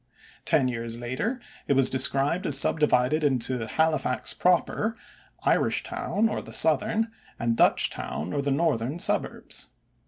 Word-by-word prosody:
Ten 130 - +2
years 115 -1 -4
later 130 - -3 0.3
it - - +2
was 135 -1 +3
described 140 +7 +3
as 140 -2 +4
divided 150 0 +1
into 125 -4 0
Halifax 155 -2 0
proper, 185 +5 0 0.5
Irishtown 220 +2 0
or - - -3
the - - -11
southern, 210 - +2 0.3
and 115 0 -1
Dutchtown 85 -6 0
or 140 - -1
the 140 - -2
northern, 140 -2 -1
suburbs. - - -2
140 Hz, 125 wpm, -25 LUFS, 125-165 Hz, 0.5 s, as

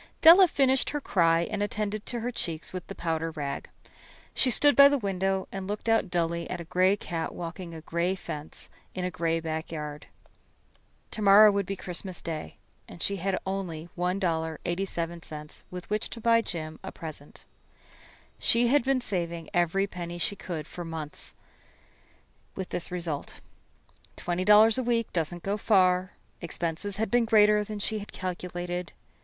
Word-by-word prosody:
Della 355 +4 +10
finished 270 -4 +2
her 295 - -2
cry 165 -10 +3
and 205 +4 -3
attended 210 0 -2
her 240 0 -2
cheeks 165 -8 -3
with 185 -1 -6
the - - -7
powder 165 -1 -1
rag. 145 -3 -5 0.6
She 260 - +2
stood 290 +4 +5
by 280 0 +10
the 285 - +2
window 195 -3 -1
and 195 -1 -5
looked 210 +3 -4
out 225 -4 +3
dully 170 -1 -1
at - - -4
a - - -5
gray 185 +4 +2
cat 165 -4 -4
walking 170 0 -6
a 160 - -8
gray 170 +4 -1
fence 150 -5 -8 0.2
in 185 -1 -2
a 180 - -2
gray 165 0 0
backyard. 155 -2 -5 1.0
To 215 - -4
morrow 205 +1 +8
would 200 -2 -1
be 195 - -2
Christmas 185 0 -3
Day, 160 -2 -5 0.3
and 170 - -8
she 200 - 0
had 190 +1 -1
only 180 -4 -4
$1.87 170 -2 -3
with 180 -1 -8
which 210 0 -1
to 230 - -7
buy 230 0 +4
Jim 160 -6 -6
a - - -6
present. 155 -3 -9 0.9
She 235 +1 +3
had 290 0 +4
been 265 0 +1
saving 170 -6 -3
every 175 +2 +2
penny 175 -3 -6
she 175 +4 -1
could 165 -5 -6
for 175 - -7
months, 160 -3 -7 1.2
with 190 -1 -5
this 175 - -3
result. 170 -5 -4 0.8
Twenty 180 +1 -2
dollars 215 +3 +7
a - - 0
week 235 -2 0
doesn't 170 +1 -2
go 200 +1 -1
far. 185 -3 +3 0.3
Expenses 170 +3 -3
had 220 -2 -1
been 240 -1 +4
greater 210 -2 +5
than 210 0 -6
she 215 +1 -2
had 205 - -9
calculated. 180 -1 -4
180 Hz, 160 wpm, -28 LUFS, 165-210 Hz, 1.2 s, Della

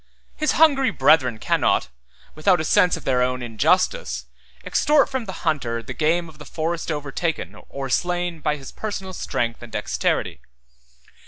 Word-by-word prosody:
His 305 - +1
hungry 280 -4 +4
brethren 130 -4 +3
cannot, - - +1 0.4
without 175 +3 +3
a - - -1
sense 180 -1 +4
of 160 - -10
their 125 -2 +1
own 125 0 0
injustice, 160 - +1 0.4
extort 295 -1 +3
from 260 -4 -3
the 190 - -5
hunter 120 -8 -1
the - - -6
game 170 +2 +1
of 155 -2 -15
the - - -8
forest 165 +1 -3
overtaken 150 +2 -3
or 135 -1 -5
slain 175 +4 -1
by 150 -1 0
his 135 -3 -10
personal 195 -3 -5
strength 115 -8 -2
and 120 -1 -10
dexterity. - - -1
160 Hz, 155 wpm, -23 LUFS, 135-185 Hz, 0.4 s, hungry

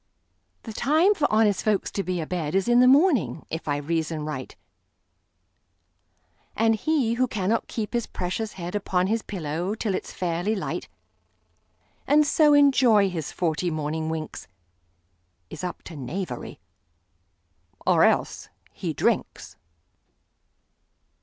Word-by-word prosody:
The 225 - -7
time 315 - +3
for 315 -7 0
honest 215 -2 +3
folks 210 -3 0
to 200 - -2
be 185 -2 -2
a - - -3
bedIs 180 +3 -1
in 240 0 +5
the 250 - +6
morning, 275 - +3
if 160 0 -5
I 145 -1 0
reason 160 +1 -2
right; 130 -4 -6 2.0
And 225 0 +3
he 250 0 +1
who 255 +2 +1
cannot 215 0 -1
keep 220 -1 -4
his 235 -1 -1
precious 185 +5 -4
headUpon 185 0 -1
his 225 +1 +1
pillow 175 +1 -3
till 215 -3 -2
it 185 - -3
's - - -8
fairly 180 +4 -1
light, 195 - -4 1.2
And 295 +2 +5
so 295 0 +4
enjoy 255 -8 +5
his 160 -4 -4
forty 175 0 -1
morning 155 0 -3
winks, 160 -1 -5 1.0
Is - - -8
up 180 - -5
to 165 - -10
knavery; 155 +8 -5 1.3
or - - +4
else—he - - -1
drinks! - - -1
195 Hz, 125 wpm, -25 LUFS, 165-235 Hz, 2.0 s, the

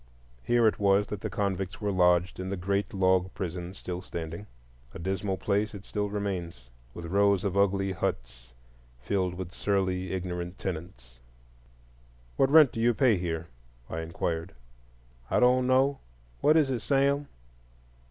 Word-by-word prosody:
Here 120 - +2
it 110 - +1
was 100 0 +4
that 105 -2 -5
the - - -3
convicts 95 -3 -2
were 105 -1 -1
lodged 90 -1 +3
in 95 0 -4
the 100 - -2
great 100 +3 -1
log 95 -1 +2
prison 90 -1 -5
still 90 -1 -5
standing. 85 +3 -6 0.5
A - - -4
dismal 95 +2 -2
place 105 +2 0
it 100 - -10
still 105 -1 -2
remains, 95 -10 -4 0.2
with 85 - -7
rows 100 +2 +2
of 100 -2 -1
ugly 100 -1 +2
huts - - -4 0.5
filled 90 +7 -1
with 90 -1 -6
surly 95 -1 -1
ignorant 90 -1 -4
tenants. 70 -10 -7 1.2
"What 135 - +3
rent 150 -3 +7
do - - -5
you 120 0 +3
pay 120 -4 +4
here?" 85 -1 -3 0.4
I 80 - -3
inquired. 80 +1 -3 0.7
"I - - +2
don't 125 +1 +4
know,—what 130 - +1
is 145 -4 +3
it, 125 - -1
Sam?" 140 +3 +1
95 Hz, 150 wpm, -28 LUFS, 85-105 Hz, 1.2 s, rent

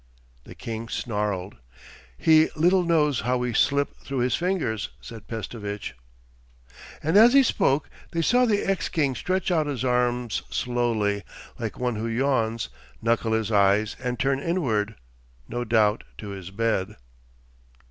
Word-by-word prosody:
The - - -11
king 115 0 -6
snarled. 105 -5 -3 0.6
'He 155 - +5
little 180 +4 +4
knows 155 -6 +2
how 125 +2 0
we 125 -1 -2
slip 140 +4 +1
through 135 -2 -3
his 125 +1 +1
fingers,' 170 - -1
said 115 -3 -11
Pestovitch. 105 -2 -5 1.1
And 160 +6 +3
as 235 +3 +8
he 275 0 +7
spoke 145 - +1 0.2
they 165 -1 -1
saw 250 +7 +4
the 205 -2 +1
ex 195 -1 -1
king 145 -5 +1
stretch 185 +7 -1
out 160 -4 +2
his 130 -4 -2
arms 125 -2 0
slowly, 110 - 0 0.4
like 115 -3 -4
one 125 -3 -1
who 110 +2 -2
yawns, 115 -2 0 0.3
knuckle 115 0 +1
his 110 -1 0
eyes 100 +1 +3
and 125 -1 -2
turn 135 +4 +1
inward—no 105 - -3
doubt 110 -2 +2
to 105 - -7
his 95 -2 -7
bed. 105 -1 -1
120 Hz, 140 wpm, -25 LUFS, 105-145 Hz, 1.1 s, as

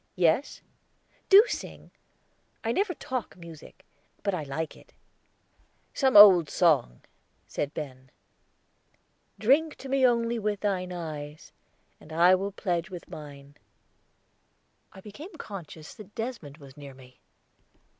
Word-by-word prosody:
"Yes." 180 - +1 0.7
"Do 400 +2 +9
sing. - - -7 0.7
I 225 - 0
never 380 - -1
talk 255 -8 -5
music; 170 +2 -13 0.4
but 200 - -1
I 180 - -2
like 150 +3 -5
it." - - -20 1.0
"Some 265 -5 +3
old 185 -6 +9
song," 145 - +2 0.4
said 145 - -4
Ben. 130 -3 -8
Singing - - -35 1.3
"Drink 290 +7 +2
to 270 - -10
me 270 0 +1
only 235 -1 +2
with 210 -1 -2
thine 185 -3 -2
eyes, 155 -3 -7 0.5
And 160 - -16
I 170 +3 +5
will 195 +2 0
pledge 180 -2 -3
with 180 -2 -10
mine," 145 -1 -11 1.3
I 190 - -14
became 285 - -11
conscious 170 - -9
that 210 -2 -14
Desmond 225 - -6
was 140 -3 -15
near 140 -2 -11
me. 130 -1 -18
180 Hz, 125 wpm, -27 LUFS, 150-225 Hz, 1.3 s, Do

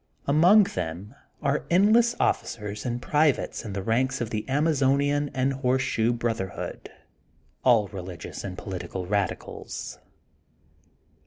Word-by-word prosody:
Among 175 +9 +6
them 100 - -5 0.3
are 140 +1 +1
endless 220 +6 +4
officers 105 0 -1
and 120 0 -2
privates 150 +2 +1
in 105 -4 -6
the 100 -1 -3
ranks 130 +5 +1
of 120 -1 -3
the 110 +3 -3
Amazonian 145 0 +2
and 130 +1 +1
the - - -3
Horseshoe 125 -3 +1
Brotherhood, 115 -6 -4 0.7
all 115 -5 +4
religious 95 -3 -7
and 90 -2 -6
political 90 -1 -5
radicals. 100 -1 -3
125 Hz, 115 wpm, -26 LUFS, 100-145 Hz, 0.7 s, Among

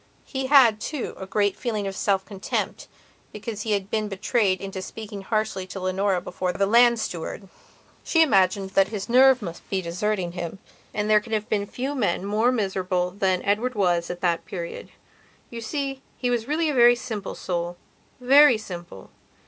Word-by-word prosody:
He 265 -1 -3
had, 255 -6 +6
too, 290 -5 -4
a 190 - -6
great 205 0 +1
feeling 215 -5 -3
of 195 -1 -4
self 195 -1 0
contempt 195 -2 -4 0.4
because 210 0 -6
he 215 -1 -1
had 200 0 -2
been 215 -1 0
betrayed 195 -1 0
into 195 -1 -6
speaking 210 0 -8
harshly 215 -2 -2
to 190 - -7
Leonora 185 +1 0
before 180 0 -3
that 195 - 0
land 235 +2 +5
steward. 195 0 -5 0.6
She 325 -1 +4
imagined 195 - +2
that 195 0 +4
his 205 -2 -5
nerve 255 0 +5
must 170 -3 -8
be 195 - 0
deserting 185 +1 -2
him, 175 +1 -5 0.3
and 210 0 -2
there 215 0 +5
can 225 +1 -8
have 215 -1 -1
been 205 -1 0
few 265 +6 -4
men 200 -8 0
more 215 +4 +2
miserable 190 -5 -1
than 185 -1 0
Edward 225 +5 0
was 175 -4 +1
at 175 0 -6
that 170 -2 +1
period. 170 -3 -6 0.6
You 235 -1 -6
see, 270 +3 -3 0.2
he 245 -1 -1
was 235 -1 -1
really 315 +3 +1
a 300 - 0
very 240 -1 +6
simple 225 -4 -5
soulvery 235 +10 +2
simple. 175 - -9
205 Hz, 175 wpm, -24 LUFS, 190-235 Hz, 0.6 s, had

